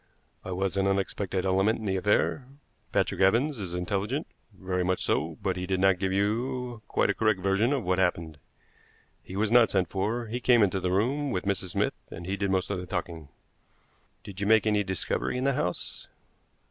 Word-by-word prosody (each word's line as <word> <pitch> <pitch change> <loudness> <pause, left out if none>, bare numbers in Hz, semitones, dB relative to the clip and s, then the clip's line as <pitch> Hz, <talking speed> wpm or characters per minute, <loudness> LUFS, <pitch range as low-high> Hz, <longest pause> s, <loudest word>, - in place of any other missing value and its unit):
I 95 - -6
was 95 +1 -1
an 95 0 +2
unexpected 95 -1 -1
element 95 +4 +2
in 110 - -7
the 95 -1 0
affair. 105 +6 +1 0.4
Patrick - - 0
Evans 120 +8 +3
is 90 -3 -5
intelligent 100 - -2 0.3
very 95 -2 -2
much 95 0 0
so; 80 +1 -1
but 95 -1 0
he 90 0 -4
did 95 0 0
not 95 -1 +3
give 95 0 0
you 120 +4 -1
quite - - +2
a - - -1
correct 110 0 +1
version 100 +6 +2
of 140 -5 0
what 90 0 0
happened. 85 -4 -1 0.8
He 95 - -10
was 105 +2 0
not 120 -1 +6
sent 95 -3 +1
for; 110 +5 -1
he 115 +3 -4
came 120 -2 +5
into 95 -1 +1
the 90 - -1
room 130 +10 +1
with 95 -7 -2
Mrs. 95 -2 -1
Smith - - +1 0.2
and 85 - -8
he 95 +2 -2
did 100 -1 -1
most 95 +1 0
of 100 - -2
the 90 - -7
talking." 80 -5 -5 0.9
"Did 100 0 -9
you 100 - 0
make 110 0 +5
any 105 -1 +2
discovery 95 +5 -2
in 125 - -2
the 140 0 +2
house?" 90 -7 -3
95 Hz, 200 wpm, -28 LUFS, 95-110 Hz, 0.9 s, not